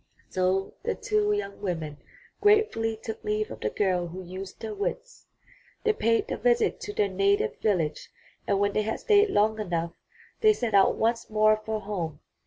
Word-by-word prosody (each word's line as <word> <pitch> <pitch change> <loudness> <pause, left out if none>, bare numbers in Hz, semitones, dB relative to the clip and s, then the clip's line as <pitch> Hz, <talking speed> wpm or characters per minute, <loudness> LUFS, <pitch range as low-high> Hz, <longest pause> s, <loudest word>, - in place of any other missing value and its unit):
So 185 +1 0
the 465 - -1
two 420 -1 +1
young 410 - -3
women 160 -6 -3 0.4
gratefully 415 - +3
took 220 0 -7
leave 210 0 -1
of 110 - -7
the 105 - -1
girl 180 - 0
who 185 +3 -8
used 185 +3 -8
her 220 -1 -4
wits. 460 - -5 0.6
They 440 -1 +3
paid 230 - +1
the - - -3
visit 240 +1 +2
to 205 - -6
their 205 - +2
native 195 +1 +1
village 170 -8 0 0.4
and 195 - +2
when 200 0 +1
they - - +2
had 220 +1 -2
stayed 420 -1 +4
long 220 - +2
enough 170 -4 -2 0.5
they 435 -1 +6
set 240 - -3
out 195 -1 +5
once 230 +1 0
more 215 0 +4
for 220 0 -3
home. 175 -7 -4
210 Hz, 180 wpm, -27 LUFS, 185-230 Hz, 0.6 s, they